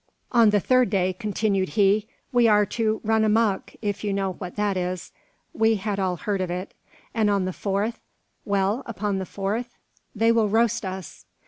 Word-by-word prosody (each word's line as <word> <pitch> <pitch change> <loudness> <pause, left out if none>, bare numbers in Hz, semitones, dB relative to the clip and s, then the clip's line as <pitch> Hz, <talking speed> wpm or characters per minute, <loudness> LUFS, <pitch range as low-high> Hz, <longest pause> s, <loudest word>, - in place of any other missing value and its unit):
"On 235 -3 +6
the 205 0 +3
third 255 +2 +3
day," 185 -2 +1
continued 200 -1 -1
he, 205 +1 +3 0.2
"we 245 -2 +4
are 210 -1 +5
to 220 0 -1
`run 220 0 +3
amuck,' 215 -2 +1
if 205 -1 -2
you 205 -1 -1
know 195 -1 -1
what 180 -1 -8
that 205 -1 0
is." 180 -1 -3 0.4
We 225 0 +3
had 200 0 -3
all 185 -2 0
heard 195 +2 -2
of 185 - -2
it. 180 +3 -4 0.4
"And 220 -3 +2
on 200 -2 +1
the 185 - -3
fourth 200 +5 -2 0.2
" - - -47
"Well? 200 +4 0
upon 205 -3 -2
the 190 - -5
fourth?" 220 +5 -3 0.4
"They 225 +2 +3
will 225 -2 +2
roast 225 0 +2
us!" 185 -2 -7
205 Hz, 190 wpm, -24 LUFS, 190-220 Hz, 0.4 s, On